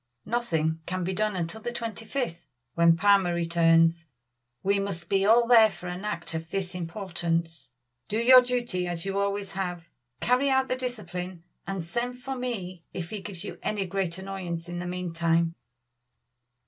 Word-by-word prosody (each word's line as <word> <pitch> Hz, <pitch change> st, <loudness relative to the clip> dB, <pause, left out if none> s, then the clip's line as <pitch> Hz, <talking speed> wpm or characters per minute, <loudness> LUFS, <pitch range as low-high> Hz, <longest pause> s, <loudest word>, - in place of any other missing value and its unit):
"Nothing 160 Hz, -9 st, 0 dB
can 185 Hz, 0 st, -2 dB
be 185 Hz, +2 st, -1 dB
done 215 Hz, +1 st, 0 dB
until 180 Hz, +5 st, -3 dB
the 240 Hz, +2 st, -3 dB
twenty 230 Hz, -2 st, -5 dB
fifth, 220 Hz, -9 st, -3 dB, 0.3 s
when 170 Hz, 0 st, +5 dB
Palmer 195 Hz, -2 st, +4 dB
returns. 165 Hz, 0 st, +3 dB, 0.6 s
We 200 Hz, +1 st, +3 dB
must 175 Hz, -4 st, -4 dB
be 195 Hz, 0 st, +3 dB
all 235 Hz, +2 st, +6 dB
there 230 Hz, -2 st, +7 dB
for 175 Hz, -2 st, -9 dB
an 180 Hz, +3 st, -5 dB
act 170 Hz, -5 st, -3 dB
of 160 Hz, 0 st, -4 dB
this 190 Hz, -1 st, -3 dB
importance. 170 Hz, -, -3 dB, 0.4 s
Do 215 Hz, -, -1 dB
your 255 Hz, +2 st, +8 dB
duty 240 Hz, -8 st, -1 dB
as 175 Hz, 0 st, -3 dB
you 195 Hz, 0 st, -1 dB
always 200 Hz, 0 st, -1 dB
have, 180 Hz, -3 st, -4 dB, 0.3 s
carry 255 Hz, +3 st, +3 dB
out 265 Hz, 0 st, +2 dB
the 255 Hz, -, +1 dB
discipline, 185 Hz, -9 st, -5 dB, 0.2 s
and 190 Hz, -3 st, -3 dB
send 240 Hz, +8 st, -2 dB
for 265 Hz, +2 st, -5 dB
me 195 Hz, -9 st, -4 dB
if 175 Hz, -2 st, -5 dB
he 210 Hz, -2 st, -4 dB
gives 190 Hz, -2 st, -7 dB
you 205 Hz, -, -7 dB
any 205 Hz, -2 st, -1 dB
great 185 Hz, -2 st, -2 dB
annoyance 185 Hz, -3 st, -4 dB
in 175 Hz, 0 st, -5 dB
the 175 Hz, -, -4 dB
meantime." 170 Hz, -2 st, 0 dB
185 Hz, 170 wpm, -27 LUFS, 170-215 Hz, 0.6 s, your